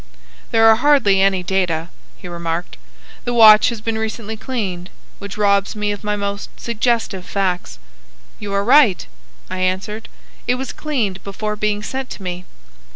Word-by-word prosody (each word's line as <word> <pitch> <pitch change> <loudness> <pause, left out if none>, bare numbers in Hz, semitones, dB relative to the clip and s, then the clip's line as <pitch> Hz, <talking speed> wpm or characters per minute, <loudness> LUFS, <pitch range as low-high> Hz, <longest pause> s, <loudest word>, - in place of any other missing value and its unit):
"There 225 0 +4
are 220 0 +7
hardly 245 -8 +4
any 195 -2 +2
data," 175 -3 -1 0.3
he 180 - -10
remarked. 170 0 -4 0.5
"The 245 - -2
watch 215 -2 +8
has 235 -3 -6
been 220 0 -2
recently 220 0 -4
cleaned, 200 -7 -4 0.3
which 200 0 -8
robs 200 0 +2
me 210 -1 -1
of 205 0 -6
my 210 0 -1
most 200 0 -4
suggestive 230 -4 -1
facts." 180 - -2 0.6
"You 205 -1 -6
are 200 0 +1
right," 230 - +5 0.4
I 185 - -5
answered. 190 +4 -2 0.4
"It 250 - +2
was 260 0 -5
cleaned 230 -11 -2
before 210 +2 -4
being 210 0 -1
sent 265 +4 -4
to 195 - -12
me." 180 0 -5
205 Hz, 155 wpm, -19 LUFS, 190-225 Hz, 0.6 s, watch